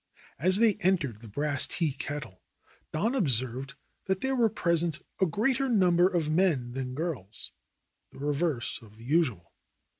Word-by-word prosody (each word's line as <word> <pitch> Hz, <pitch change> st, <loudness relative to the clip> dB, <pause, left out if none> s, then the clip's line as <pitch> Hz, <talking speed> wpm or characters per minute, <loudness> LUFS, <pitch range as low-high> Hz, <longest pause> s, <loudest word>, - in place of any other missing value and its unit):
As 185 Hz, +6 st, +4 dB
they 220 Hz, -1 st, +4 dB
entered 155 Hz, -, +1 dB
the 115 Hz, -, -10 dB
Brass 145 Hz, +5 st, 0 dB
Tea 165 Hz, -4 st, 0 dB
Kettle 135 Hz, -8 st, -6 dB, 0.5 s
Don 215 Hz, +11 st, 0 dB
observed 130 Hz, -, 0 dB, 0.3 s
that 190 Hz, 0 st, 0 dB
there 265 Hz, 0 st, 0 dB
were 235 Hz, -3 st, +4 dB
present 170 Hz, -4 st, 0 dB
a 190 Hz, -, +4 dB
greater 260 Hz, -, +1 dB
number 180 Hz, -5 st, +5 dB
of 175 Hz, -5 st, 0 dB
men 155 Hz, -7 st, +2 dB
than 130 Hz, 0 st, -4 dB
girls, 130 Hz, -, -4 dB, 0.6 s
the -, -, -15 dB
reverse 145 Hz, -3 st, -1 dB
of 110 Hz, -1 st, -16 dB
the 115 Hz, -, -13 dB
usual. 125 Hz, -, +1 dB
155 Hz, 150 wpm, -29 LUFS, 130-185 Hz, 0.6 s, number